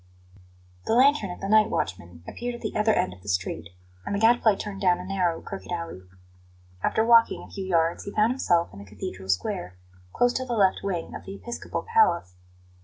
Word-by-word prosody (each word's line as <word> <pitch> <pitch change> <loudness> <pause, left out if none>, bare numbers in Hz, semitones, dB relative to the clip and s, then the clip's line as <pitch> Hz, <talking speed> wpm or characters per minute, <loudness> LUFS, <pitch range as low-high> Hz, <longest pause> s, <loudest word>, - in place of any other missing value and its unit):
The 225 - +2
lantern 265 -5 +4
of 180 - -8
the 195 - -3
night 215 +1 +5
watchman 90 -3 -4
appeared 245 0 -5
at 235 - -11
the 215 - -4
other 215 +1 +3
end 90 - 0
of 90 - -16
the 100 - -8
street, 90 -3 -2 0.3
and 200 - -3
the - - -1
Gadfly 225 -1 +4
turned 195 -1 -6
down 180 -2 +4
a 180 - -8
narrow, 185 -3 0
crooked 195 -2 -8
alley. 170 - -5 0.8
After 220 - +1
walking 230 0 +5
a - - -14
few 195 -2 -5
yards 170 -2 +1
he 200 - -5
found 215 +3 +3
himself 175 - +1
in 100 - -11
the 100 - -10
Cathedral 95 -1 -8
Square, 90 -1 -2 0.3
close 245 - +2
to 260 - -1
the 245 - -3
left 195 -4 +3
wing 180 -4 -3
of - - -8
the 195 - -7
episcopal 235 +4 -5
palace. 435 - +2
195 Hz, 205 wpm, -26 LUFS, -, 0.8 s, night